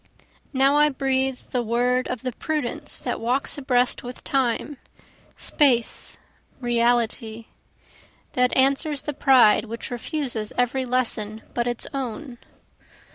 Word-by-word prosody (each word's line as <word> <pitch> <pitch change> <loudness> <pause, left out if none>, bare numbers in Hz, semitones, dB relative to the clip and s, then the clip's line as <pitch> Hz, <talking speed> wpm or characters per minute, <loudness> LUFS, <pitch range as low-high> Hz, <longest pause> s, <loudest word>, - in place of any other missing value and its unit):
Now 275 +1 +3
I 300 0 +5
breathe 265 -1 0
the 250 - +1
word 245 +2 +1
of 250 -1 -4
the 255 - -2
prudence 300 +1 -3
that - - -3
walks 245 +4 0
abreast 250 -2 +2
with 250 +1 -9
time, 265 +2 -1 0.6
space, 250 -6 +1 0.4
reality, 235 -2 0 0.9
That 250 0 +2
answers 275 +2 +2
the 295 - -3
pride 260 -6 +5
which 230 +2 -7
refuses 245 -4 -2
every 250 +1 +1
lesson 225 -4 -1
but 240 0 -1
its 240 -1 -2
own. 260 -1 -5
250 Hz, 120 wpm, -24 LUFS, 235-270 Hz, 0.9 s, I